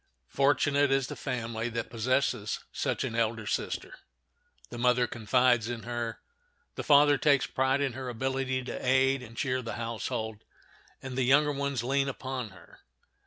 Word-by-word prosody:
Fortunate 145 Hz, 0 st, +3 dB
is 135 Hz, -1 st, +2 dB
the -, -, -6 dB
family 115 Hz, -1 st, -3 dB
that 115 Hz, -1 st, -4 dB
possesses 115 Hz, -2 st, 0 dB
such -, -, -1 dB
an -, -, -3 dB
elder 115 Hz, -1 st, 0 dB
sister. -, -, -3 dB, 0.7 s
The 120 Hz, -, -6 dB
mother 125 Hz, 0 st, +3 dB
confides 120 Hz, +1 st, +2 dB
in 120 Hz, -2 st, -5 dB
her, 120 Hz, -1 st, -4 dB, 0.5 s
the -, -, -5 dB
father 145 Hz, -1 st, +5 dB
takes 140 Hz, -3 st, +4 dB
pride 130 Hz, +1 st, +1 dB
in 135 Hz, -3 st, 0 dB
her 130 Hz, 0 st, -5 dB
ability 130 Hz, +1 st, -1 dB
to -, -, -6 dB
aid 130 Hz, +1 st, +3 dB
and 115 Hz, -2 st, -12 dB
cheer 130 Hz, -2 st, 0 dB
the 115 Hz, -2 st, -5 dB
household, 110 Hz, -2 st, -4 dB, 0.6 s
and 130 Hz, -1 st, -6 dB
the 130 Hz, -, 0 dB
younger 145 Hz, +4 st, +4 dB
ones 140 Hz, -4 st, -2 dB
lean 135 Hz, +2 st, +1 dB
upon 130 Hz, -3 st, -5 dB
her. 95 Hz, -3 st, -17 dB
125 Hz, 160 wpm, -29 LUFS, 115-135 Hz, 0.7 s, father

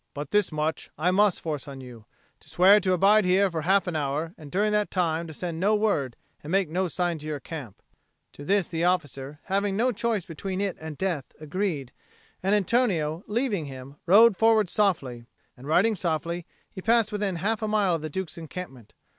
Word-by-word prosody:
But 145 Hz, -1 st, -6 dB
this 210 Hz, -3 st, +2 dB
much 155 Hz, 0 st, -2 dB
I 175 Hz, +4 st, +2 dB
must 200 Hz, 0 st, +3 dB
force 150 Hz, -4 st, -4 dB
on 135 Hz, -1 st, -8 dB
you 120 Hz, -4 st, -11 dB, 0.3 s
to -, -, -17 dB
swear 195 Hz, +4 st, +6 dB
to 185 Hz, -2 st, +1 dB
abide 200 Hz, +4 st, +5 dB
here 190 Hz, +1 st, +3 dB
for 165 Hz, -1 st, -2 dB
half 190 Hz, +3 st, +3 dB
an 180 Hz, -, -3 dB
hour, 150 Hz, +3 st, -2 dB
and 150 Hz, -3 st, -12 dB
during 210 Hz, +3 st, +1 dB
that 210 Hz, 0 st, +1 dB
time 170 Hz, -2 st, 0 dB
to -, -, -8 dB
send 170 Hz, +1 st, -5 dB
no 205 Hz, +4 st, +3 dB
word 155 Hz, -, 0 dB, 0.2 s
and 150 Hz, -, -9 dB
make 190 Hz, -2 st, +1 dB
no 185 Hz, +3 st, 0 dB
sign 175 Hz, -1 st, -2 dB
to 150 Hz, -, -9 dB
your 150 Hz, -2 st, -3 dB
camp." 135 Hz, -, -9 dB, 0.5 s
To 145 Hz, -, -10 dB
this 195 Hz, +3 st, +2 dB
the 165 Hz, 0 st, -3 dB
officer, 145 Hz, -5 st, -1 dB
having 200 Hz, 0 st, -1 dB
no 250 Hz, +3 st, +2 dB
choice 225 Hz, -4 st, -1 dB
between 185 Hz, +3 st, -5 dB
it 200 Hz, -2 st, -1 dB
and 160 Hz, -2 st, -7 dB
death, 175 Hz, -8 st, -1 dB
agreed; 155 Hz, -4 st, -3 dB, 0.5 s
and 195 Hz, +3 st, +2 dB
Antonio, 190 Hz, -7 st, +1 dB
leaving 210 Hz, -, -1 dB
him, 135 Hz, 0 st, -9 dB
rode 215 Hz, +4 st, +7 dB
forward 220 Hz, -2 st, +3 dB
softly; 135 Hz, -, 0 dB, 0.3 s
and, 130 Hz, +3 st, -12 dB
riding 220 Hz, +8 st, +3 dB
softly, 170 Hz, -1 st, -2 dB, 0.2 s
he 190 Hz, -, -8 dB
passed 225 Hz, 0 st, +2 dB
within 205 Hz, -3 st, -1 dB
half 205 Hz, +6 st, -1 dB
a 215 Hz, -, -1 dB
mile 210 Hz, -4 st, +2 dB
of 165 Hz, -, -1 dB
the 155 Hz, -, -4 dB
Duke's 170 Hz, +1 st, -5 dB
encampment. 155 Hz, -, -9 dB
180 Hz, 200 wpm, -26 LUFS, 155-200 Hz, 0.5 s, rode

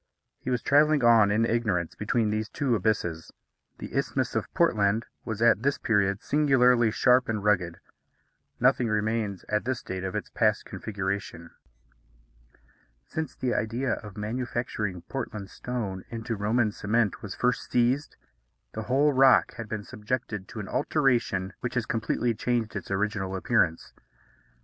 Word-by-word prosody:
He -, -, -5 dB
was 125 Hz, -2 st, -1 dB
travelling 150 Hz, -1 st, +4 dB
on, 115 Hz, -3 st, +6 dB
in 110 Hz, +3 st, +2 dB
ignorance, 105 Hz, -8 st, 0 dB
between 110 Hz, 0 st, 0 dB
these 110 Hz, 0 st, -2 dB
two 135 Hz, -4 st, -1 dB
abysses. 90 Hz, -6 st, -1 dB, 0.5 s
The -, -, -8 dB
Isthmus -, -, -1 dB
of -, -, -2 dB
Portland 105 Hz, +2 st, +2 dB, 0.2 s
was 110 Hz, 0 st, -2 dB
at 115 Hz, -3 st, +5 dB
this 140 Hz, +2 st, +1 dB
period 100 Hz, -2 st, +1 dB
singularly 125 Hz, -5 st, +4 dB
sharp 125 Hz, +3 st, +3 dB
and 105 Hz, -3 st, -2 dB
rugged. 90 Hz, -5 st, +1 dB, 0.8 s
Nothing 125 Hz, -1 st, +3 dB
remains 105 Hz, -2 st, -1 dB
at 105 Hz, 0 st, 0 dB
this 130 Hz, -1 st, -3 dB
date 95 Hz, 0 st, -5 dB
of 95 Hz, -1 st, -4 dB
its -, -, -4 dB
past -, -, +1 dB
configuration. 95 Hz, -4 st, -4 dB, 1.5 s
Since 160 Hz, -3 st, -5 dB
the 125 Hz, -2 st, -1 dB
idea 115 Hz, +4 st, -1 dB
of 105 Hz, -2 st, -8 dB
manufacturing 110 Hz, -4 st, -3 dB
Portland 105 Hz, -3 st, -6 dB
stone 105 Hz, -7 st, -4 dB
into 115 Hz, 0 st, -4 dB
Roman 110 Hz, +2 st, +1 dB
cement 105 Hz, +1 st, 0 dB
was 105 Hz, -3 st, -6 dB
first 125 Hz, 0 st, 0 dB
seized, 125 Hz, +5 st, +1 dB, 0.6 s
the 110 Hz, -, -4 dB
whole 140 Hz, +6 st, +2 dB
rock 130 Hz, 0 st, +5 dB
has 115 Hz, -2 st, -6 dB
been 110 Hz, -1 st, -4 dB
subjected 105 Hz, -3 st, -4 dB
to 110 Hz, -, -8 dB
an 100 Hz, -, -5 dB
alteration 120 Hz, -10 st, +1 dB
which 120 Hz, -, -4 dB
has 120 Hz, -3 st, 0 dB
completely 115 Hz, +1 st, 0 dB
changed 115 Hz, -1 st, -1 dB
its 100 Hz, -, -5 dB
original 100 Hz, -1 st, -1 dB
appearance. 95 Hz, -6 st, 0 dB
110 Hz, 145 wpm, -27 LUFS, 100-125 Hz, 1.5 s, on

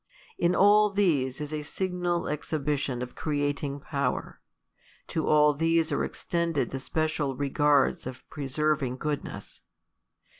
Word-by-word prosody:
In 175 Hz, +1 st, +3 dB
all 210 Hz, +1 st, +6 dB
these 155 Hz, -11 st, +1 dB
is 150 Hz, 0 st, -5 dB
a 155 Hz, -, -2 dB
signal 175 Hz, +1 st, -2 dB
exhibition 145 Hz, -4 st, -2 dB
of 125 Hz, -, -8 dB
creating 145 Hz, -1 st, -2 dB
power: 140 Hz, -4 st, -3 dB, 0.7 s
to 160 Hz, -, -1 dB
all 150 Hz, -1 st, +5 dB
these 165 Hz, +1 st, +1 dB
are 145 Hz, -, +1 dB
extended 170 Hz, -3 st, -1 dB
the 135 Hz, -, -3 dB
special 155 Hz, -1 st, -1 dB
regards 140 Hz, 0 st, +2 dB
of 130 Hz, 0 st, -9 dB
preserving 145 Hz, -2 st, -1 dB
goodness. 150 Hz, +1 st, -5 dB
150 Hz, 120 wpm, -28 LUFS, 140-165 Hz, 0.7 s, all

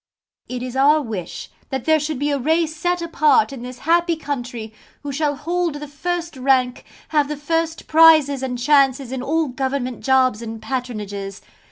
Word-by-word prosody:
It 250 Hz, -1 st, -4 dB
is 255 Hz, 0 st, -6 dB
our 290 Hz, +3 st, +5 dB
wish 220 Hz, -, -6 dB, 0.2 s
that 265 Hz, -2 st, -4 dB
there 315 Hz, -1 st, +4 dB
should 300 Hz, -1 st, -3 dB
be 290 Hz, +2 st, -1 dB
a 285 Hz, -, 0 dB
race 315 Hz, +3 st, +1 dB
set 350 Hz, +2 st, -1 dB
apart 300 Hz, -7 st, +3 dB
in 260 Hz, -, -8 dB
this 250 Hz, 0 st, -8 dB
happy 340 Hz, +1 st, +3 dB
country, 245 Hz, -7 st, -5 dB, 0.3 s
who 290 Hz, -, -4 dB
shall 290 Hz, +1 st, 0 dB
hold 335 Hz, +2 st, -2 dB
the 295 Hz, 0 st, -7 dB
first 340 Hz, +3 st, -4 dB
rank, 255 Hz, -1 st, +1 dB, 0.2 s
have 295 Hz, -2 st, +2 dB
the 300 Hz, 0 st, -4 dB
first 325 Hz, +2 st, -2 dB
prizes 310 Hz, -4 st, +5 dB
and 255 Hz, -2 st, -3 dB
chances 270 Hz, -1 st, +2 dB
in 260 Hz, -1 st, -3 dB
all 315 Hz, +3 st, 0 dB
government 260 Hz, -1 st, -3 dB
jobs 260 Hz, -4 st, +3 dB
and 225 Hz, -1 st, -6 dB
patronages. 210 Hz, -5 st, -5 dB
280 Hz, 175 wpm, -21 LUFS, 250-315 Hz, 0.3 s, our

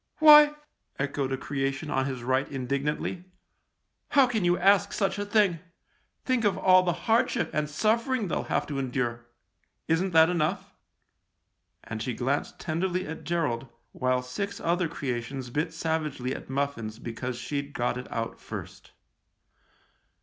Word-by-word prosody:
" -, -, -50 dB
Why! 300 Hz, -1 st, +8 dB, 0.2 s
" -, -, -52 dB
echoed 140 Hz, -1 st, -2 dB
a 135 Hz, -, 0 dB
creation 135 Hz, +2 st, -3 dB
on 135 Hz, 0 st, +1 dB
his 130 Hz, -3 st, -5 dB
right 130 Hz, +2 st, +1 dB
indignantly. 140 Hz, +6 st, -2 dB, 0.4 s
" -, -, -51 dB
How 275 Hz, -, +8 dB
can 225 Hz, -5 st, -1 dB
you 175 Hz, 0 st, +3 dB
ask 200 Hz, +1 st, +4 dB
such 200 Hz, 0 st, 0 dB
a 205 Hz, -, -2 dB
thing? 205 Hz, -5 st, +3 dB, 0.7 s
Think 255 Hz, -3 st, +1 dB
of 205 Hz, -2 st, +2 dB
all 185 Hz, 0 st, +6 dB
the 180 Hz, -1 st, +1 dB
hardship 230 Hz, +1 st, +2 dB
and 150 Hz, -1 st, -1 dB
suffer 225 Hz, -, +1 dB
ing 220 Hz, -6 st, -2 dB
they'll -, -, -2 dB
have -, -, 0 dB
to 140 Hz, -2 st, -4 dB
endure. 120 Hz, -3 st, -2 dB, 0.6 s
Isn't 170 Hz, +4 st, +1 dB
that 160 Hz, 0 st, +7 dB
enough? 180 Hz, +4 st, -1 dB, 0.6 s
" 85 Hz, +1 st, -51 dB
and 110 Hz, -1 st, -6 dB
she 120 Hz, +1 st, -3 dB
glanced 135 Hz, +3 st, -2 dB
tenderly 180 Hz, +3 st, -1 dB
at 160 Hz, -, -7 dB
Gerald, 145 Hz, -8 st, -1 dB, 0.2 s
while 130 Hz, 0 st, 0 dB
six 200 Hz, +11 st, -4 dB
other 175 Hz, +1 st, +1 dB
creations 130 Hz, -4 st, -4 dB
bit 155 Hz, +5 st, -1 dB
savagely 155 Hz, -6 st, -2 dB
at -, -, -8 dB
muffins 135 Hz, -6 st, -2 dB
because 120 Hz, +1 st, -5 dB
she'd 140 Hz, +3 st, -4 dB
got 120 Hz, 0 st, 0 dB
it 125 Hz, 0 st, -7 dB
out 115 Hz, 0 st, -3 dB
first. -, -, -9 dB
150 Hz, 160 wpm, -27 LUFS, 130-185 Hz, 0.7 s, Why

